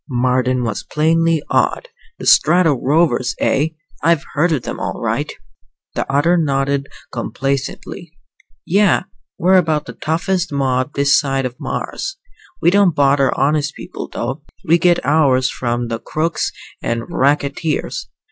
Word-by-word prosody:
Marden 125 0 +1
was 115 -3 -2
plainly 165 0 +1
awed. - - +1 0.3
"The - - -8
Strato 175 -4 +5
Rovers, 130 -2 +1
eh? 145 +3 +2 0.3
I've 165 -1 +2
heard 170 +4 +2
of 140 -7 0
them, - - -5
all - - -4
right." - - -1 0.6
The - - -3
other 155 +6 +3
nodded 140 -2 0 0.2
complacently. 140 +5 -4 0.5
"Yeah. 200 +1 +3 0.3
We're 185 +2 +4
about 155 -4 +1
the - - -8
toughest 175 +3 -1
mob 130 -1 0
this 140 +1 +4
side 135 -2 -1
of 125 -1 -5
Mars. - - -4 0.5
We 170 - +5
don't 195 -4 +4
bother 140 -1 +3
honest 150 +2 +1
people, - - -7
though. 135 +4 -4 0.2
We 170 +2 +4
get 175 -4 +2
ours 135 -3 +3
from 120 -1 -2
the 115 -1 -3
crooks 155 +4 -2 0.3
and 115 0 -2
racketeers. 145 +2 -1
145 Hz, 140 wpm, -18 LUFS, 135-165 Hz, 0.6 s, Strato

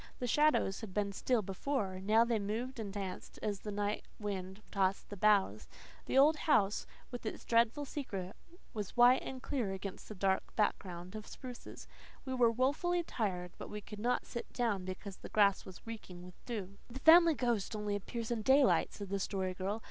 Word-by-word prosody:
The 250 - -3
shadows 295 -7 +3
had 210 -5 -8
been 205 -1 0
still 235 +2 +1
before; 195 -1 -2
now 215 +4 +4
they 235 -2 +1
moved 230 +6 -3
and 205 -3 -4
danced, 195 -2 -6
as 205 -2 -1
the 210 - -6
night 205 +1 -1 0.2
wind 195 -1 -5
tossed 195 -1 0
the - - -4
boughs. 195 - +3 0.4
The - - +1
old 300 +3 +6
house, 210 -11 +2 0.2
with 245 - -6
its 220 - -5
dreadful 235 +5 +2
secret, 200 -10 -5 0.4
was 210 +1 -5
white 245 +2 +7
and 260 -1 -7
clear 235 -9 -1
against 190 0 -7
the 215 - -7
dark 190 0 0
background 185 -4 -1
of 215 0 -7
spruces. 250 -2 -9 0.4
We 260 - -3
were 245 -2 +4
woefully 290 +9 +1
tired, 185 - -2
but - - -7
we 210 - -5
could 210 0 -10
not 245 +3 0
sit 235 - -6
down 215 -7 0
because 185 +1 -6
the - - -10
grass 200 -2 +3
was 185 -2 -12
reeking 200 -6 -8
with 180 - -14
dew. 200 -5 -5
"The 250 +2 -8
Family 335 0 +8
Ghost 235 -5 0
only 210 -1 -2
appears 230 +3 -4
in 230 -2 0
daylight," 265 +4 +4
said 200 -2 -7
the 200 0 -1
Story 190 -1 -2
Girl. 195 +4 -3
210 Hz, 190 wpm, -34 LUFS, 195-245 Hz, 0.4 s, Family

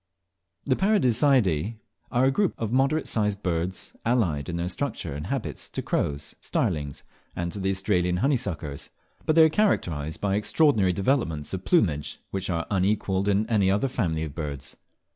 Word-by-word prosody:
The 130 - +2
Paradiseidae 125 - +3 0.4
are 125 +2 +3
a 135 - +4
group 195 +6 +1
of 115 -2 -3
moderate 135 +4 +2
sized 105 -2 -1
birds, 90 +1 -2
allied 95 -12 +1
in 85 - -3
their 85 +1 -2
structure 90 - -3
and 75 +4 -5
habits 90 - -4
to - - -4
crows, 70 0 -2
starlings, 70 -2 -2 0.3
and 85 0 -3
to 100 - -5
the 95 0 0
Australian 95 -2 +1
honeysuckers; 90 - -2 0.4
but 155 - +3
they 165 - +8
are 160 - +6
characterised 80 - 0
by 100 -1 +1
extraordinary 105 - +3
developments 95 - 0
of 95 0 -4
plumage, 80 - +1
which 95 0 -3
are 85 -2 -1
unequalled 100 0 +1
in 100 +1 +2
any 105 -5 +2
other 100 +7 +2
family 80 -10 -1
of 75 -3 -5
birds. 70 -4 -5
95 Hz, 160 wpm, -26 LUFS, 80-125 Hz, 0.4 s, they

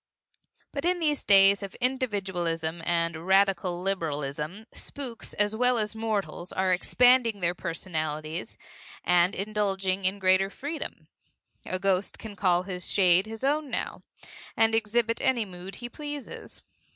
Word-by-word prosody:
But 280 - -4
in 360 +1 +2
these 300 -4 0
days 195 0 +6
of 200 -1 -7
individualism 190 - -1
and 170 0 0
radical 190 -2 +2
liberalism, 155 0 -3
spooks 255 -5 -5
as 205 +1 +1
well 250 +1 +3
as 215 0 -1
mortals 205 -6 -3
are 185 0 +1
expanding 245 +3 +4
their 175 -1 +1
personalities 160 -2 -4 0.5
and 180 +1 +3
indulging 195 -2 -1
in 190 +2 +2
greater 190 0 +3
freedom. 290 +9 -6 0.6
A 185 - -1
ghost 190 0 0
can 215 -2 -9
call 180 -3 +2
his 180 -2 -4
shade 185 0 +4
his 225 +2 -8
own 290 +1 +1
now, - - -3 0.6
and 225 0 +4
exhibit 230 +1 +1
any 245 -4 +2
mood 185 0 -8
he 240 - -6
pleases. 290 +1 -7
195 Hz, 135 wpm, -27 LUFS, 180-225 Hz, 0.6 s, days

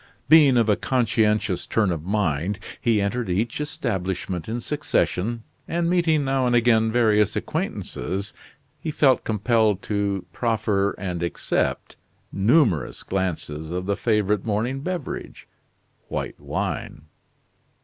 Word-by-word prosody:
Being 145 -4 +7
of 115 -2 +3
a 105 - +4
conscientious 110 -6 +1
turn 105 -5 +1
of 80 -3 -3
mind, 95 -1 0 0.2
he 115 -3 +2
entered 105 +3 -1
each 110 +9 -1
establishment 95 - -3
in 115 +2 -2
succession 120 -5 -1 0.2
and 170 0 0
meeting 160 -5 +2
now 135 -1 +1
and 120 - +2
again 115 -2 +3
various 110 -4 +3
acquaintances, 95 +8 -3 0.5
he 160 - -4
felt 140 -4 +3
compelled 110 -2 +1
to 100 -3 -1
proffer 110 -3 0
and 90 -2 -4
accept 85 - -2 0.3
numerous 105 - +2
glasses 80 -5 -3
of 90 +2 -3
the 100 +1 0
favorite 105 -3 +1
morning 115 +5 -1
beverage 175 -1 -5 0.6
white - - -4
wine. 75 - -4
105 Hz, 120 wpm, -24 LUFS, 95-120 Hz, 0.6 s, Being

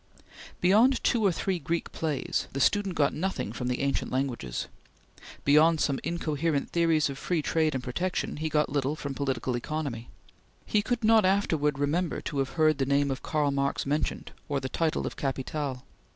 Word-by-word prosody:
Beyond 220 +8 +4
two 235 -2 +2
or 195 - +4
three 180 +2 -1
Greek 165 +3 -2
plays, 150 -5 -2
the 135 - -3
student 195 +6 +2
got 145 -3 +2
nothing 180 - -2
from 125 +1 -4
the 125 0 -1
ancient 140 -1 -1
languages. 125 - -2 0.8
Beyond 155 +3 +5
some 140 -3 +1
incoherent 160 -3 -1
theories 165 -2 +3
of 140 -1 -6
free 170 -4 -1
trade 155 -2 +1
and 130 - -3
protection, 180 +9 -2
he 160 +1 -2
got 150 -2 +1
little 145 +1 0
from 140 -3 -5
Political 135 -2 -1
Economy. 130 -4 -4 0.6
He 210 - +2
could 240 +2 -2
not 220 0 +6
afterwards 160 -7 +2
remember 155 +5 0
to 145 - -3
have 135 -1 -1
heard 155 -2 +4
the 135 - +2
name 140 0 +2
of 135 - -4
Karl 150 -2 0
Marx 140 0 -1
mentioned, 150 +2 -2 0.2
or 140 -1 0
the 130 -1 -4
title 160 +2 0
of - - -5
"Capital." 135 -1 -3
150 Hz, 180 wpm, -28 LUFS, 135-170 Hz, 0.8 s, not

